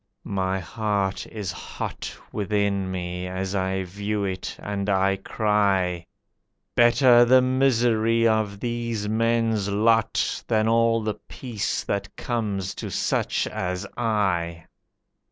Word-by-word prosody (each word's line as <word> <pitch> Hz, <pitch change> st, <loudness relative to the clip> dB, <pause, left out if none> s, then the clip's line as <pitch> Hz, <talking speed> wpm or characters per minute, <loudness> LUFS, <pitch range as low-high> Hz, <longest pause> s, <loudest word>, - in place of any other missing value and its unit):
My 95 Hz, -1 st, -1 dB
heart 100 Hz, 0 st, -2 dB
is 105 Hz, -4 st, -5 dB
hot 90 Hz, -, -6 dB, 0.2 s
Within 100 Hz, -2 st, 0 dB
me 90 Hz, 0 st, -4 dB
as 95 Hz, +1 st, -3 dB
I 95 Hz, -1 st, 0 dB
view 100 Hz, +3 st, -3 dB
it, 95 Hz, -1 st, -3 dB
and 100 Hz, 0 st, -3 dB
I 95 Hz, 0 st, +3 dB
cry, 95 Hz, -4 st, +1 dB, 0.7 s
"Better 120 Hz, 0 st, +6 dB
the 130 Hz, +1 st, +5 dB
misery 115 Hz, -3 st, +3 dB
of 110 Hz, -3 st, 0 dB
these 115 Hz, -3 st, -2 dB
men's 115 Hz, -2 st, +1 dB
lot 110 Hz, +2 st, +2 dB
Than 110 Hz, 0 st, +2 dB
all 115 Hz, 0 st, +3 dB
the 105 Hz, -1 st, -3 dB
peace 120 Hz, -6 st, -3 dB
that 100 Hz, 0 st, -3 dB
comes 105 Hz, -6 st, -2 dB
to -, -, -4 dB
such -, -, 0 dB
as 90 Hz, -1 st, -3 dB
I!" 90 Hz, -8 st, 0 dB
105 Hz, 120 wpm, -24 LUFS, 95-115 Hz, 0.7 s, Better